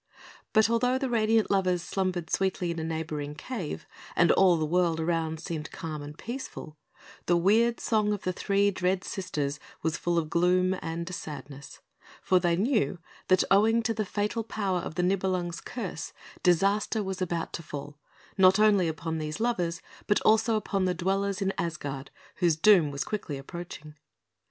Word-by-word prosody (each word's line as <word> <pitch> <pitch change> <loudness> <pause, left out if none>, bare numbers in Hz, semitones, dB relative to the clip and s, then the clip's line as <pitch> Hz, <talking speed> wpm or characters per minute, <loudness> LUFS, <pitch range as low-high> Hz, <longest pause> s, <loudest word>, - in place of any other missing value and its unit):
But 220 0 +5
although 250 +3 +2
the 260 -2 -2
radiant 220 -1 +2
lovers 185 -3 +2
slumbered 185 -3 -2
sweetly 190 -2 0
in 165 - -4
a - - -3
neighbouring 155 -2 -4
cave, 190 -2 -5 0.3
and 175 - +5
all 185 -3 +5
the 155 - 0
world 170 0 +1
around 160 -1 -1
seemed 155 -2 -5
calm 155 -2 -6
and 145 +1 -9
peaceful, 235 - -7 0.5
the 175 - +4
weird 225 +7 +3
song 215 -2 +1
of 205 -2 -3
the 185 - -1
three 200 +2 +2
dread 185 0 0
Sisters 150 -7 -3 0.2
was 160 0 0
full 175 0 0
of 155 -2 -1
gloom 180 +2 +3
and 170 +2 -4
sadness; 145 -3 -8 0.4
for 185 - +4
they 175 -1 +2
knew 215 0 +1 0.3
that, 185 -1 +4
owing 220 +4 +4
to 225 +1 0
the 220 0 -1
fatal 210 +3 -2
power 200 -4 -1
of 160 - -6
the 180 - 0
Nibelung's 185 -2 0
curse, 200 -10 -6 0.3
disaster 200 +5 +2
was 190 -1 -4
about 170 -2 -2
to - - -4
fall, 145 -2 -8 0.4
not 185 0 +7
only 210 -4 +4
upon 160 0 -3
these 155 +4 -4
lovers, 180 -8 -1 0.2
but 205 - +3
also 220 +1 +4
upon 200 -3 0
the 180 -1 0
dwellers 195 +2 0
in 195 0 0
Asgard, 145 -5 -4 0.3
whose 170 -3 +3
doom 170 -2 +5
was 140 0 -3
quickly 195 -9 -4
approaching. 155 +1 -8
180 Hz, 170 wpm, -28 LUFS, 160-205 Hz, 0.5 s, not